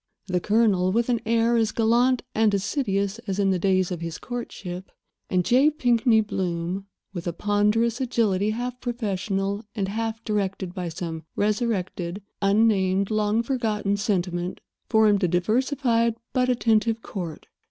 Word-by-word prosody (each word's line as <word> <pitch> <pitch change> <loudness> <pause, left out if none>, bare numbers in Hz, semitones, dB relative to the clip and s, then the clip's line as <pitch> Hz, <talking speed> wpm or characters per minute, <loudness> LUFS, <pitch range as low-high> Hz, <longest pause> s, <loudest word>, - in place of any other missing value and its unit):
The 180 -2 0
Colonel, 205 -3 +2
with 235 +4 +1
an 235 -2 +1
air 230 +1 +3
as 220 -2 +2
gallant 240 +3 +2
and 220 -1 +3
assiduous 200 -1 -1
as 195 -1 -2
in 195 -1 +2
the 185 - +1
days 185 0 +2
of 175 -2 -4
his 165 -1 -4
courtship, 195 -6 -6 0.4
and 180 -1 +1
J. 265 +5 +5
Pinkney 240 -6 +3
Bloom, 185 -1 -3 0.3
with 175 -2 -5
a 170 - -1
ponderous 210 +5 +1
agility 215 -5 +1
half 245 +3 -4
professional 200 -3 -2
and 195 -2 -1
half 225 +1 -3
directed 195 -3 -2
by 180 -2 -4
some 165 -1 -5
resurrected, 200 -4 -1 0.2
unnamed, 200 -1 +2
long 215 +1 +1
forgotten 220 -5 0
sentiment, 180 -3 -1 0.3
formed 215 -3 +4
a - - +4
diversified 230 - +1 0.2
but 255 0 +2
attentive 230 -2 +2
court. 170 -6 -6
210 Hz, 140 wpm, -25 LUFS, 190-230 Hz, 0.4 s, J